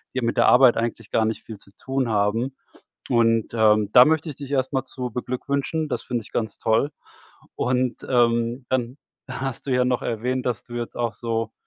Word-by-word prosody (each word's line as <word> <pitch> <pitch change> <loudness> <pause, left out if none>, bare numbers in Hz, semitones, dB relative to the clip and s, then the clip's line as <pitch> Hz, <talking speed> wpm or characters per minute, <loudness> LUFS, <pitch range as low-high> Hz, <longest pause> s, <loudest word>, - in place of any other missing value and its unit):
die 130 - 0
mit 115 0 -1
der - - +5
Arbeit 125 -1 +6
eigentlich 115 -1 -3
gar 110 - +2
nicht 110 0 -3
viel 110 - -9
zu - - -20
tun 130 -2 -2
haben. 110 +5 0 0.5
Und, 115 -1 +2
ähm, 110 -2 +4
da 125 - +9
möchte 160 +2 +1
ich 150 - -5
dich 140 -1 -8
erst 130 0 0
mal 130 0 0
zu 125 -1 -6
beglückwünschen. 140 +6 -2
Das 130 - -3
finde 120 -2 -3
ich - - -13
ganz 110 -3 -3
toll 115 +6 +1 0.7
und, 125 0 0
ähm, 120 0 +1
dann 130 +1 -1 0.3
hast 130 -1 -5
du - - -2
ja 125 0 +3
noch 125 -1 0
erwähnt, 125 +2 -2
dass 120 -3 -1
du 120 - -11
jetzt 120 -1 -4
auch 120 -2 -1
so, 115 +1 -3
120 Hz, 200 wpm, -23 LUFS, 115-130 Hz, 0.7 s, da